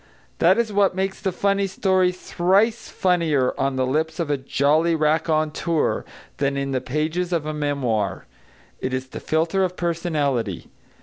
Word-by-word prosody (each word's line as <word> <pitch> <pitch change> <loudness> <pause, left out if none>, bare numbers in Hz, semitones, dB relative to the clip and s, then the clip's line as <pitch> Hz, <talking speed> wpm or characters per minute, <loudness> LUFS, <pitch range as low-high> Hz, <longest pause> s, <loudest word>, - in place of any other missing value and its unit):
That - - +5
is 230 -3 0
what 200 -2 +3
makes 190 0 -2
the 190 - 0
funny 200 +2 +1
story 185 -1 +2
thrice 190 +5 +1
funnier 165 -8 +1
on 135 0 -1
the 130 0 +1
lips 160 +5 -1
of 160 -3 -1
a - - +3
jolly 145 +5 +2
raconteur 155 0 0 0.3
than 140 0 0
in 140 0 -2
the 130 -1 -1
pages 155 +6 -2
of 165 -4 0
a 155 - -3
memoir. 130 -9 -1 0.5
It 130 0 -2
is 130 0 -5
the - - -7
filter 165 +5 +1
of 180 -1 -2
personality. 145 - -1
160 Hz, 160 wpm, -23 LUFS, 140-180 Hz, 0.5 s, That